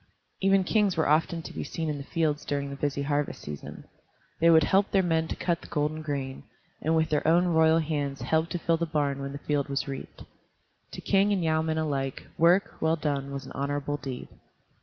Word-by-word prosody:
Even 195 Hz, 0 st, +4 dB
kings 200 Hz, -2 st, +2 dB
were 160 Hz, -, +2 dB
often 165 Hz, +2 st, +2 dB
to -, -, -8 dB
be -, -, -4 dB
seen 165 Hz, -1 st, -4 dB
in 150 Hz, -2 st, -2 dB
the -, -, -6 dB
fields 150 Hz, -1 st, -1 dB
during 140 Hz, -1 st, -2 dB
the -, -, -5 dB
busy 140 Hz, 0 st, -2 dB
harvest 145 Hz, 0 st, -1 dB
season. 75 Hz, -1 st, -8 dB, 0.6 s
They 165 Hz, -, +5 dB
would 160 Hz, -2 st, +7 dB
help 195 Hz, +6 st, +3 dB
their 195 Hz, -1 st, +3 dB
men 160 Hz, -2 st, +1 dB
to -, -, -4 dB
cut 170 Hz, -2 st, -1 dB
the -, -, -11 dB
golden 150 Hz, 0 st, -1 dB
grain, 140 Hz, -3 st, -4 dB, 0.4 s
and 160 Hz, +2 st, +1 dB
with 160 Hz, 0 st, +2 dB
their 150 Hz, -1 st, 0 dB
own 170 Hz, +2 st, +5 dB
royal 160 Hz, -1 st, +4 dB
hands 145 Hz, -4 st, -2 dB
help 160 Hz, +1 st, +1 dB
to -, -, -2 dB
fill 165 Hz, -1 st, +1 dB
the 170 Hz, 0 st, -1 dB
barn 145 Hz, -3 st, 0 dB
when 140 Hz, 0 st, -4 dB
the 140 Hz, -, -6 dB
field 145 Hz, 0 st, -1 dB
was 140 Hz, +1 st, -1 dB
reaped. 135 Hz, -1 st, -7 dB, 0.7 s
To -, -, -6 dB
king 200 Hz, +1 st, +3 dB
and 190 Hz, -4 st, +1 dB
yeomen 160 Hz, 0 st, +1 dB
alike, 140 Hz, -4 st, -2 dB
work, 175 Hz, +4 st, +4 dB
well 160 Hz, +1 st, +3 dB
done, 140 Hz, -3 st, -2 dB
was 140 Hz, -1 st, -5 dB
an -, -, -10 dB
honorable 145 Hz, +1 st, -2 dB
deed. 135 Hz, -3 st, -7 dB
155 Hz, 215 wpm, -27 LUFS, 140-165 Hz, 0.7 s, would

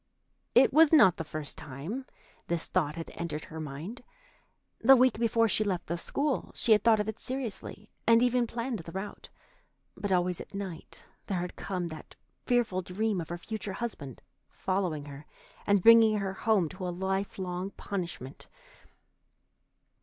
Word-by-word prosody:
It 255 Hz, +2 st, +6 dB
was 315 Hz, +1 st, +7 dB
not 240 Hz, -, +7 dB
the 165 Hz, -, -3 dB
first 155 Hz, -1 st, -6 dB
time 160 Hz, -, -6 dB, 0.4 s
this 170 Hz, -1 st, 0 dB
thought 155 Hz, -5 st, 0 dB
had 165 Hz, -1 st, -7 dB
entered 160 Hz, -3 st, -4 dB
her 160 Hz, -3 st, -8 dB
mind. 155 Hz, -, -7 dB, 0.8 s
The 270 Hz, +4 st, +8 dB
week 255 Hz, -3 st, +3 dB
before 230 Hz, 0 st, +3 dB
she 215 Hz, -, +1 dB
left 190 Hz, -4 st, -2 dB
the 170 Hz, -, -2 dB
school, 280 Hz, -, -1 dB
she 235 Hz, -, +2 dB
had 210 Hz, -, +6 dB
thought 225 Hz, -2 st, +5 dB
of 210 Hz, -, -1 dB
it 220 Hz, 0 st, -4 dB
seriously, 235 Hz, -5 st, -5 dB, 0.2 s
and 230 Hz, +1 st, +6 dB
even 245 Hz, -1 st, +2 dB
planned 235 Hz, 0 st, -3 dB
the 165 Hz, 0 st, -9 dB
route, 195 Hz, +3 st, -7 dB, 0.7 s
but 205 Hz, -, -4 dB
always 180 Hz, -1 st, +1 dB
at -, -, -11 dB
night 190 Hz, -5 st, -7 dB, 0.2 s
there 185 Hz, -3 st, -1 dB
had 180 Hz, -, -5 dB
come 180 Hz, -3 st, -3 dB
that 155 Hz, -1 st, -10 dB, 0.3 s
fearful 235 Hz, -7 st, +2 dB
dream 200 Hz, +1 st, -1 dB
of 160 Hz, -, -8 dB
her 175 Hz, -, -4 dB
future 210 Hz, +2 st, -5 dB
husband 175 Hz, -, -6 dB, 0.3 s
following 180 Hz, -6 st, -2 dB
her, 145 Hz, +1 st, -10 dB, 0.4 s
and 205 Hz, -3 st, +3 dB
bringing 225 Hz, -2 st, +7 dB
her 195 Hz, -2 st, -2 dB
home 205 Hz, -4 st, +2 dB
to 185 Hz, +2 st, -6 dB
a -, -, -1 dB
life 190 Hz, +2 st, -2 dB
long 185 Hz, 0 st, -3 dB
punishment. 175 Hz, -9 st, -6 dB
195 Hz, 165 wpm, -29 LUFS, 170-225 Hz, 0.8 s, The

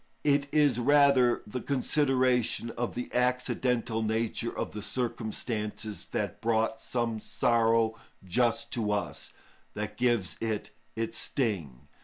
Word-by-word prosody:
It 145 Hz, -1 st, +3 dB
is 145 Hz, -5 st, +3 dB
rather 140 Hz, -2 st, +4 dB
the 120 Hz, +4 st, -5 dB
consideration 130 Hz, -4 st, +1 dB
of 120 Hz, +1 st, -3 dB
the 125 Hz, +1 st, -5 dB
accidental 125 Hz, -2 st, 0 dB
nature 110 Hz, +1 st, -1 dB
of -, -, -2 dB
the 105 Hz, -, -6 dB
circumstances 110 Hz, -1 st, -3 dB
that -, -, -3 dB
brought 115 Hz, 0 st, +1 dB
some 115 Hz, -2 st, -1 dB
sorrow 115 Hz, 0 st, +2 dB, 0.3 s
just 115 Hz, +6 st, +1 dB
to 105 Hz, -3 st, 0 dB
us, 105 Hz, -, -3 dB, 0.4 s
that 105 Hz, 0 st, -4 dB
gives 120 Hz, -7 st, +1 dB
it 110 Hz, -2 st, -2 dB, 0.2 s
its 115 Hz, 0 st, -1 dB
sting. 90 Hz, -, -2 dB
115 Hz, 120 wpm, -29 LUFS, 110-125 Hz, 0.4 s, rather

